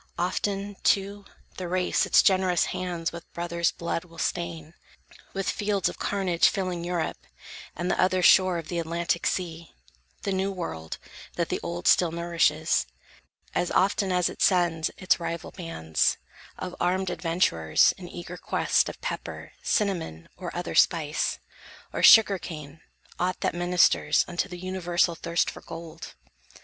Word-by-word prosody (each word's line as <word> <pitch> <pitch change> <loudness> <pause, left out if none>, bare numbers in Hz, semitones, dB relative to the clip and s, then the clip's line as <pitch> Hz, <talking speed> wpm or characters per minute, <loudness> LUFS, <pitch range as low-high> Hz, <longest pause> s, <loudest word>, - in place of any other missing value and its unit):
Often, 195 +2 -2
too, 200 0 +1 0.3
the 185 - -4
race 180 +1 +1
Its - - +6
generous 185 -2 +3
hands 180 -2 -3
with 170 0 -10
brothers' 170 0 0
blood 170 0 -3
will 165 -2 -17
stain, 165 -2 -3 0.6
With 195 0 -3
fields 205 -3 0
of - - -10
carnage 190 -4 +2
filling 185 -3 -3
Europe, 175 -2 -2 0.6
and 175 +2 -1
The - - +1
other 185 0 +2
shore 185 -1 +6
of 165 -2 -6
the 175 - -2
Atlantic 170 +1 -1
sea, 170 -2 -4 0.5
The 200 - -1
new 190 +1 0
world, 80 - -5 0.4
that - - -1
the - - -1
old 85 0 -4
still 175 -3 +5
nourishes, 165 - +1 0.7
As 175 - 0
often 195 0 +2
as 180 -1 +2
it - - -7
sends 170 -3 +2
its 185 - +2
rival 170 -1 -4
bands 80 - -1 0.4
Of 180 -1 -5
armed 185 +1 0
adventurers, 165 - +2
in 180 -2 -10
eager 175 +1 -8
quest - - +1
Of - - -9
pepper, - - -5
cinnamon, 175 - -1
or 180 -2 -6
other 175 0 -4
spice, 155 -3 +2 0.6
Or - - -2
sugar 210 -4 +8
cane, 155 -3 -9 0.4
aught 180 +1 -1
that - - 0
ministers 175 -3 +3
Unto 175 +2 -2
the 180 - -7
universal 175 -1 0
thirst 170 +1 -1
for - - -12
gold. 165 0 -9
175 Hz, 150 wpm, -26 LUFS, 165-185 Hz, 0.7 s, sugar